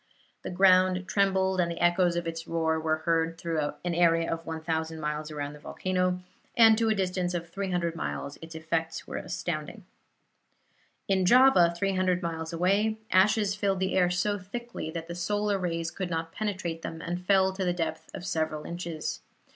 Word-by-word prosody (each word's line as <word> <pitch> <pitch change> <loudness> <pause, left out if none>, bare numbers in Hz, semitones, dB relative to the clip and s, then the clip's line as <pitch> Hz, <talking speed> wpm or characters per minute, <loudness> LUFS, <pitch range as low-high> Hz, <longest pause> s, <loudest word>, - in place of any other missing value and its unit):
The - - -5
ground 185 0 +4
trembled 190 -1 +2
and 170 - 0
the 170 - -5
echoes 175 0 +3
of 175 0 -2
its 165 0 -5
roar 160 -1 0
were 155 0 +1
heard 165 -1 +1
through 160 -3 -2
an 175 - 0
area 165 -1 +3
of 165 0 -5
1,000 160 0 -3
miles 150 0 -3
around 145 -1 -4
the 150 - -12
volcano, 185 +3 -1 0.4
and 225 -1 +8
to 225 -1 +2
a 220 - +2
distance 180 -2 -1
of 170 -1 -5
300 180 -3 -2
miles 140 -3 -4
its 165 0 -10
effects 165 0 -2
were - - -5
astounding. 170 +5 -4 1.2
In 190 -1 +2
Java, 245 -4 +6
300 185 -1 +1
miles 160 -1 -3
away, 200 +6 +1
ashes 200 +2 +4
filled 195 -2 0
the 190 0 0
air 180 -2 +3
so 205 +3 0
thickly 235 +1 -6
that 165 0 -5
the 170 - -5
solar 205 +3 0
rays 170 -2 -2
could 185 -2 -4
not 165 -1 -3
penetrate 185 -6 -3
them, 165 - -6
and 175 +1 -4
fell 190 0 +3
to 190 0 -3
the 180 - +1
depth 160 -2 -3
of 180 - -7
several 155 -3 -1
inches. 170 -2 -4
175 Hz, 180 wpm, -28 LUFS, 165-190 Hz, 1.2 s, and